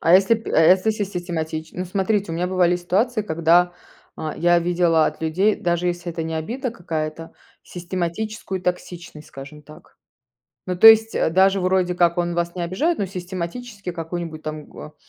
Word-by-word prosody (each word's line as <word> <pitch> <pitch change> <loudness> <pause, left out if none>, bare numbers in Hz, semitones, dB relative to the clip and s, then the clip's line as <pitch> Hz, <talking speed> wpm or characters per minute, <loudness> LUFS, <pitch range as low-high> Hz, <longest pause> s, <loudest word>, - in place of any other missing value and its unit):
А 170 +2 +4
если 195 +4 +5
п 225 - -6
а - - +4
если 185 +6 +5
сис 205 -2 -3
систематич 160 -3 -4
Ну, 180 - -4
смотрите, 195 0 -1
у - - -3
меня 175 +2 -1
бывали 180 -1 +2
ситуации, 210 +6 0
когда, 170 0 +2 0.5
э, - - -6
я 175 +1 +3
видела 170 -2 +2
от - - -5
людей, 190 +7 +1
даже 175 0 -1
если 175 -1 -3
это 165 - -4
не 160 0 -4
обида 235 - -3
какая-то, 165 -4 -5 0.3
систематическую 185 +3 -4
токсичность, 175 -3 -5
скажем 140 +2 -11
так. 155 +1 -17 0.7
Ну 185 - -2
то 225 +5 +8
есть, 225 0 +7
э, - - +1
даже, 190 +2 +3
вроде 185 -1 +1
как, 175 0 +2
он 175 0 0
вас 170 +1 -2
не 175 - -3
обижает, 290 - 0
но 200 - -1
систематически 185 +3 -6
какую-нибудь 165 -1 -6
там 155 -1 -6
гоа 150 - -12
175 Hz, 180 wpm, -22 LUFS, 165-190 Hz, 0.7 s, то